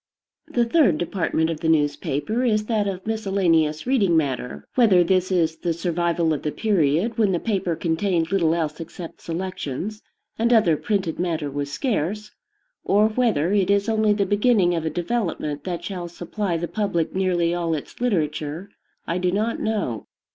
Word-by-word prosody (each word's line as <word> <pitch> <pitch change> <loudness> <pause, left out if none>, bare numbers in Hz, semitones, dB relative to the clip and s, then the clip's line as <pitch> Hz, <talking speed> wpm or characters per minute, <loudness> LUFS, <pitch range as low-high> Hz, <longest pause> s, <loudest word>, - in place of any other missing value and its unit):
The 240 -1 +1
third 230 - +3
department 165 -1 0
of 160 - -4
the 160 - 0
newspaper 150 - 0
is 215 -3 +1
that 210 -2 0
of 190 -1 -4
miscellaneous 190 -8 +1
reading 205 -10 +3
matter. 130 -5 -2
Whether 210 -8 +5
this 185 +1 +1
is 165 -3 +1
the 170 -2 -1
survival 170 -1 0
of 150 - -3
the 150 - -2
period 195 +2 +1
when 205 -4 +3
the 175 - +1
paper 190 -6 -1
contained 165 +1 0
little 170 -4 +2
else 155 -3 -2
except 165 0 -8
"selections," 185 - -4 0.4
and 235 +2 +2
other 215 -9 +5
printed 190 0 -2
matter 160 -5 -1
was 140 0 -3
scarce, 210 - -2 0.5
or 210 +2 +3
whether 215 -7 +1
it 200 -2 +2
is 200 0 +2
only 220 -1 +2
the 205 -1 +1
beginning 205 -2 +3
of 165 -2 -2
a - - +1
development 170 -6 -2
that 175 -2 -4
shall 180 -3 -5
supply 175 +2 -3
the 170 +1 -3
public 185 -6 -1
nearly 180 -3 +1
all 170 -2 0
its 150 - -8
literature, 160 -4 -1 0.3
I 170 +2 -1
do 180 0 +1
not 215 +4 -1
know. 205 - -2
180 Hz, 170 wpm, -23 LUFS, 160-210 Hz, 0.5 s, Whether